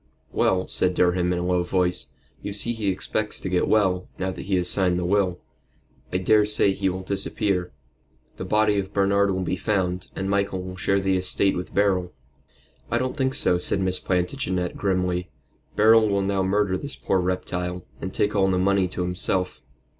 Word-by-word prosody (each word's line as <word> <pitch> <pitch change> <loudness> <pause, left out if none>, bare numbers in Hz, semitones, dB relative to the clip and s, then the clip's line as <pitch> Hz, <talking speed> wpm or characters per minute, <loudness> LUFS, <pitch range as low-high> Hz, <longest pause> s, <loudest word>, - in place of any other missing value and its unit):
"Well," 95 0 +1
said 90 -1 0
Durham, 90 0 +2
in 90 - 0
a 90 - -2
low 90 0 +2
voice, 90 0 +1 0.3
"you 100 - -5
see 115 +4 0
he 110 -3 -4
expects 105 +3 -2
to 95 - -4
get 90 -1 +1
well, 95 -4 +2
now 95 0 -2
that 90 - -8
he 100 - +1
has 90 -1 +1
signed 90 -2 +2
the 90 - -2
will. 95 -1 +1 0.7
I 90 - +1
daresay 105 +1 +3
he 95 0 0
will 95 +1 -4
disappear. 95 -1 -1 0.7
The - - -5
body 105 -1 +2
of 95 -1 -5
Bernard 100 0 +2
will 95 -1 -1
be 90 - -1
found, 95 -2 -1
and 95 - -3
Michael 100 -2 0
will 90 0 -7
share 95 +1 +1
the 95 -1 +1
estate 95 +1 +1
with 90 - -6
Beryl." 95 -3 +1 0.8
"I 120 - +1
don't 130 +3 -2
think 130 -2 0
so," 90 - +2
said 95 - +1
Miss 95 -1 0
Plantagenet, 90 -1 -1
grimly. 90 -2 -1 0.5
"Beryl 110 0 +5
will 100 -1 +1
now 100 0 0
murder 95 0 +1
this 145 0 -7
poor 95 - 0
reptile, 90 -1 -3 0.2
and 95 - -4
take 105 +2 0
all 95 -1 +3
the 95 - +1
money 95 0 +2
to 90 0 -4
himself." 90 0 -2
95 Hz, 190 wpm, -24 LUFS, 90-100 Hz, 0.8 s, Beryl